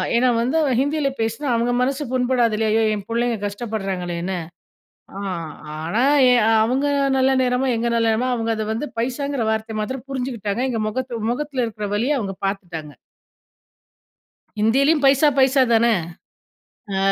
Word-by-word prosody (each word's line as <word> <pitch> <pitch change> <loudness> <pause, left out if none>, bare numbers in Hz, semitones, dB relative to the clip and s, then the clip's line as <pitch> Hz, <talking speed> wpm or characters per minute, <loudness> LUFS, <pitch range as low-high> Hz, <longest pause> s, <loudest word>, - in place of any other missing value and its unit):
ஏன்னா 250 +1 +4
வந்து 255 +7 0 0.2
ஹிந்தியில 285 0 +1
பேசுனா 225 +6 -2
அவங்க 235 +1 +1
மனசு 275 +3 0
புண்படாது 250 -3 +1
இல்லையா, 220 0 0
ஐயோ 225 - +3
என் 200 - -7
பிள்ளைங்க 235 0 0
கஷ்டப்படுறாங்களேன்னு. 190 -4 -3 0.8
அ - - -5 0.6
ஆனா 200 +9 0 0.3
எ - - +6 0.3
அவங்க 260 +5 0 0.3
நல்ல 265 +1 +3
நேரமோ 250 +1 +1
எங்க 230 +1 -1
நல்ல 230 -1 +2
நேரமோ 230 +3 0
அவங்க 230 -1 -1
அத 220 - -2
வந்து 290 +7 -3
பைசாங்கற 260 +1 -2
வார்த்தைய 220 0 -2
மாத்திரம் 255 +4 -4
புரிஞ்சுக்கிட்டாங்க 245 -5 -3
எங்க 225 -3 -2
முகத்து 240 -1 -4
முகத்துல 275 -1 -2
இருக்கிற 210 -2 -5
வலிய 265 +7 +1
அவங்க 195 -4 -4
பார்த்துட்டாங்க. 175 -6 -5 1.7
ஹிந்திலயும் 275 +8 +3
பைசா 275 +2 +5
பைசா 265 +1 +4
தானே! 230 0 +4 1.0
அ, 190 - 0
235 Hz, 140 wpm, -21 LUFS, 215-260 Hz, 1.7 s, எ